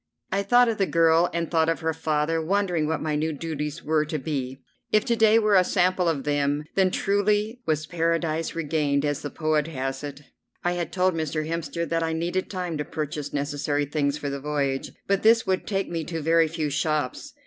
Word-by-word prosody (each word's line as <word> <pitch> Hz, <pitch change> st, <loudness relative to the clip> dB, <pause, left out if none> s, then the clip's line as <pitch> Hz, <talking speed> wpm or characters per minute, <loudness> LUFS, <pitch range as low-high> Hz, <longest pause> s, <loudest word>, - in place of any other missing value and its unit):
I 195 Hz, -, +1 dB
thought 245 Hz, +5 st, +5 dB
of 225 Hz, -2 st, -1 dB
the 195 Hz, -, +2 dB
girl 165 Hz, +1 st, +4 dB
and 170 Hz, -1 st, -2 dB
thought 160 Hz, -1 st, +3 dB
of 165 Hz, -, -1 dB
her 160 Hz, 0 st, 0 dB
father, 155 Hz, +1 st, 0 dB
wondering 180 Hz, -2 st, 0 dB
what 160 Hz, -1 st, -1 dB
my 155 Hz, -1 st, -1 dB
new 155 Hz, +2 st, 0 dB
duties 150 Hz, 0 st, -4 dB
were 155 Hz, 0 st, +2 dB
to 155 Hz, +1 st, -3 dB
be. 135 Hz, -2 st, -4 dB, 0.3 s
If 215 Hz, +2 st, +3 dB
to 235 Hz, -3 st, +2 dB
day 220 Hz, -1 st, +5 dB
were 215 Hz, -2 st, +3 dB
a 185 Hz, -2 st, +6 dB
sample 180 Hz, -1 st, +2 dB
of 145 Hz, -5 st, -1 dB
them 145 Hz, 0 st, 0 dB
then 190 Hz, -1 st, +3 dB
truly 210 Hz, +5 st, 0 dB
was 155 Hz, -1 st, 0 dB
Paradise 165 Hz, -1 st, -1 dB
regained, 150 Hz, -3 st, 0 dB
as 145 Hz, -1 st, -1 dB
the 145 Hz, -, -4 dB
poet 155 Hz, -1 st, 0 dB
has 135 Hz, -2 st, -4 dB
it. 145 Hz, 0 st, -7 dB, 0.4 s
I 175 Hz, -, +1 dB
had 175 Hz, -2 st, -3 dB
told 185 Hz, +1 st, +2 dB
Mr. 155 Hz, -1 st, -2 dB
Hemster 165 Hz, 0 st, -3 dB
that 165 Hz, 0 st, 0 dB
I 165 Hz, 0 st, -1 dB
needed 175 Hz, +3 st, -2 dB
time 180 Hz, -5 st, -3 dB
to -, -, 0 dB
purchase 150 Hz, -1 st, -4 dB
necessary 145 Hz, 0 st, -1 dB
things 145 Hz, 0 st, 0 dB
for 145 Hz, -2 st, -4 dB
the 140 Hz, -, -4 dB
voyage, 140 Hz, -2 st, -2 dB
but 200 Hz, 0 st, +1 dB
this 225 Hz, +1 st, +5 dB
would 185 Hz, -1 st, -1 dB
take 195 Hz, -2 st, -1 dB
me 165 Hz, -1 st, -3 dB
to 165 Hz, 0 st, -4 dB
very 165 Hz, +1 st, +3 dB
few 155 Hz, -2 st, -3 dB
shops. 150 Hz, -2 st, -1 dB
160 Hz, 210 wpm, -25 LUFS, 150-180 Hz, 0.4 s, a